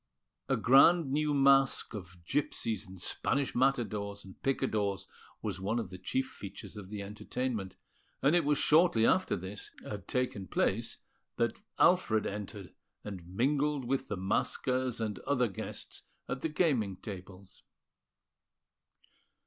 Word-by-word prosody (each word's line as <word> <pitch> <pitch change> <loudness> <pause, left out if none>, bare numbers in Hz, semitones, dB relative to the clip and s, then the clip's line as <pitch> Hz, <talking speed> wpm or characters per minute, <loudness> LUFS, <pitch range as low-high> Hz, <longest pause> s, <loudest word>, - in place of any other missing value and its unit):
A - - +3
grand 140 +4 +6
new 150 +1 +1
masque 135 -3 +4
of 90 -4 -9
Gipsies 115 - -1
and 95 0 -11
Spanish 140 +8 0
Matadors 105 -6 0
and 95 - -14
Picadors 110 -7 0 0.4
was 95 -3 -3
one 105 +5 0
of 110 -6 -3
the 90 - -8
chief 130 +8 -1
features 100 0 -9
of 100 -3 -8
the 105 -1 -5
entertainment; 105 0 -3 0.4
and 145 +5 +4
it 175 - +4
was 145 0 +2
shortly 150 -7 +5
after 185 +7 +3
this 95 +2 -6 0.2
had 105 -2 -6
taken 125 -7 -1
place - - 0 0.4
that - - 0 0.2
Alfred 110 -1 +4
entered, 100 -2 -6 0.3
and 95 -5 -7
mingled 140 +7 +1
with 135 +2 -1
the 105 - -3
maskers 125 +6 0
and 110 -2 -2
other 125 -4 +1
guests 95 - -7 0.3
at 130 - -3
the 160 - 0
gaming 135 - +1
tables. 95 -2 -9
110 Hz, 135 wpm, -32 LUFS, 100-135 Hz, 0.4 s, grand